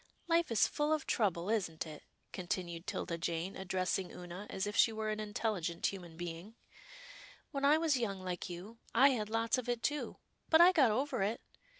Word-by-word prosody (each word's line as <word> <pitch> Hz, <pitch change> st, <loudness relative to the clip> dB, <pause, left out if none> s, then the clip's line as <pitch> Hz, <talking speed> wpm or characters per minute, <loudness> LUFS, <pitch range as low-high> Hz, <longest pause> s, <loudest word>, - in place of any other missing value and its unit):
" -, -, -38 dB
Life 335 Hz, 0 st, +3 dB
is 230 Hz, -4 st, +4 dB
full 300 Hz, 0 st, -1 dB
of 310 Hz, -3 st, -1 dB
trouble, 185 Hz, -6 st, +1 dB
isn't 175 Hz, -8 st, -1 dB
it," 155 Hz, -2 st, -9 dB, 0.3 s
continued 175 Hz, -2 st, -4 dB
'Tilda 170 Hz, -2 st, -3 dB
Jane, 170 Hz, +2 st, -2 dB
addressing 185 Hz, 0 st, -1 dB
Oonah 180 Hz, +3 st, -8 dB
as 190 Hz, 0 st, -2 dB
if 205 Hz, 0 st, -4 dB
she 225 Hz, -, +5 dB
were 220 Hz, 0 st, -2 dB
an 215 Hz, -, -3 dB
intelligent 205 Hz, -5 st, -2 dB
human 175 Hz, -4 st, -3 dB
being. 175 Hz, +5 st, -6 dB, 0.5 s
" -, -, -17 dB
When 280 Hz, -2 st, -1 dB
I 295 Hz, +2 st, +6 dB
was 320 Hz, -4 st, +2 dB
young 200 Hz, -5 st, -2 dB
like 180 Hz, -1 st, -4 dB
you, 190 Hz, +7 st, -8 dB, 0.2 s
I 270 Hz, +4 st, +7 dB
had 215 Hz, -6 st, -1 dB
lots 225 Hz, +2 st, +1 dB
of 250 Hz, -1 st, -5 dB
it, 240 Hz, -1 st, -1 dB
too, 295 Hz, -1 st, -1 dB, 0.3 s
but 320 Hz, -, +6 dB
I 350 Hz, +2 st, +9 dB
got 295 Hz, -9 st, +5 dB
over 255 Hz, +2 st, 0 dB
it. 210 Hz, +4 st, 0 dB
210 Hz, 200 wpm, -34 LUFS, 180-255 Hz, 0.5 s, I